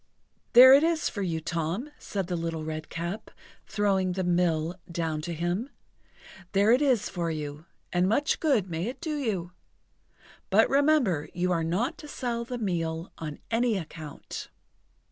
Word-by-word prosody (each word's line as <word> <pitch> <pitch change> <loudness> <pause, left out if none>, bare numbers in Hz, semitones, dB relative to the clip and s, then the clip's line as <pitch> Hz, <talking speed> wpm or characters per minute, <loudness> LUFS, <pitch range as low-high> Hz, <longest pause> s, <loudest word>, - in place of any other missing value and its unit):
"There 255 +2 +11
it 280 - +7
is 325 0 +1
for 205 - -5
you, 170 -4 -1
Tom," 170 - -3
said 195 -3 -3
the 175 0 -3
Little 165 -1 -3
Redcap, 170 +6 -5 0.4
throwing 195 -3 +1
the 190 +1 -2
mill 175 -2 +1 0.2
down 165 -3 -2
to 170 +3 -5
him; 175 - -2 0.8
"there 200 +3 +4
it 250 +4 +5
is 255 -8 +2
for 170 -3 -2
you, 150 0 -5 0.3
and 180 +1 +3
much 285 +7 +1
good 265 - +2
may 170 +2 -3
it 250 - -5
do 315 -3 -3
you! 200 - -2 1.0
But - - +5
remember 275 - +3
you 180 +1 0
are 165 -2 +1
not 180 +9 -1
to 300 - -9
sell 240 -4 -3
the 245 +1 -5
meal 165 -5 -2
on 150 -2 -5
any 230 -1 +2
account." 155 -3 -7
180 Hz, 160 wpm, -28 LUFS, 165-235 Hz, 1.0 s, There